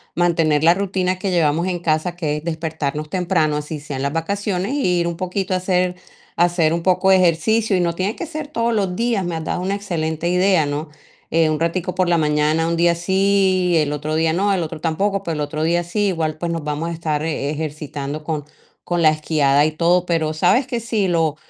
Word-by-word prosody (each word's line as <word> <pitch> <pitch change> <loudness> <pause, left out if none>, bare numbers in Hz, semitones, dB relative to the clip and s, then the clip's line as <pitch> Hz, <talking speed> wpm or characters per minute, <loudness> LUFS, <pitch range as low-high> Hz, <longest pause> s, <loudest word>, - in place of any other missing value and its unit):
mantener 165 -3 +2
la 170 +1 +6
rutina 185 -1 -1
que 190 0 -2
llevamos 165 0 +2
en 180 -1 -2
casa, 165 +1 0
que 150 -4 -2
es 150 - -7
despertarnos 160 -2 -3
temprano, 160 -4 +1
así 150 +1 -5
sea 145 -2 -6
en 135 - -3
las 140 - -1
vacaciones, 195 +5 -2
y 180 -12 +1
ir 170 - 0
un 170 -1 -3
poquito 185 +1 -2
a - - +2
hacer 180 -1 0 0.4
a 175 - +5
hacer 170 -3 +1
un 170 0 -2
poco 190 +1 +2
de 190 - +7
ejercicio, 195 +5 +2
y - - +2
no 170 -1 0
tiene 195 +4 -1
que - - -5
ser 310 -2 -6
todos 235 -5 -1
los 195 -4 0
días. 230 -4 0
Me 175 -1 -3
has 160 - -4
dado 175 - -2
una 195 +2 -1
excelente 170 -4 -2
idea, 180 -2 +3
¿no? 145 +2 -4 0.4
Eh, 160 -1 +3
un 155 - -1
ratico 170 +2 -1
por 185 -1 +1
la 170 -1 +3
mañana, 155 +1 +1
un 170 - 0
día 170 0 +3
sí, 190 0 +2
el 150 -2 +1
otro 150 +1 -3
día 160 0 +2
no, 200 +4 +1
el 180 -3 0
otro 160 0 -6
tampoco, 195 +5 -1
pero 170 - -3
el 150 - -3
otro 155 +1 -3
día 175 +2 +1
sí. 205 +4 -1
Igual, 160 -4 -1
pues 170 +1 -3
nos 165 -2 -3
vamos 150 +2 -3
a - - -4
estar 155 -2 -2
e-ejercitando 150 -1 -4
con 155 -2 -2 0.4
con 175 -1 -1
la 155 - +6
esquiada, 150 -2 +2
y 155 - 0
todo. 175 +3 +2
Pero, 160 -3 0
¿sabes 245 - +3
qué? 240 -2 -2
Sí, 220 -3 -1
lo 165 -3 +1
170 Hz, 230 wpm, -20 LUFS, 155-185 Hz, 0.4 s, de